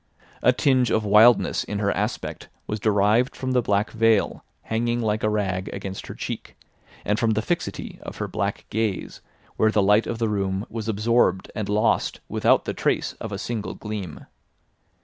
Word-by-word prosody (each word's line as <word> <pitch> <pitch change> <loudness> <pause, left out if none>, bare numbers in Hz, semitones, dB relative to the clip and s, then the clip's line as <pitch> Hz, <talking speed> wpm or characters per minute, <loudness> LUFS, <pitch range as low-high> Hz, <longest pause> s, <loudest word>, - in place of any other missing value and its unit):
A 125 - +5
tinge 130 -1 +2
of 110 -1 +1
wildness 110 +4 +5
in 105 - -4
her 100 -1 +1
aspect - - -3 0.2
was 105 - -3
derived 105 +4 +2
from 130 -1 -3
the 125 -1 +3
black 105 -1 0
veil 115 -2 +2 0.2
hanging 120 +1 -1
like 110 -2 0
a 110 - +2
rag 95 -3 -1
against 95 -1 -6
her - - -7
cheek, - - -6 0.5
and 105 +2 +1
from 115 -1 +2
the 110 - 0
fixity 175 +5 -3
of - - -8
her - - -3
black - - -3
gaze 110 -3 -2 0.4
where 110 - +4
the 105 -2 +2
light 105 +3 +4
of 115 - -3
the 115 0 0
room 100 -1 -1
was 115 -2 -5
absorbed 105 -3 +1
and 105 -2 -4
lost 105 +2 +1
without - - +2
the - - -2
trace - - 0
of 110 - -5
a 100 - -3
single 110 +1 -4
gleam. 105 -7 -6
110 Hz, 180 wpm, -24 LUFS, 100-115 Hz, 0.5 s, A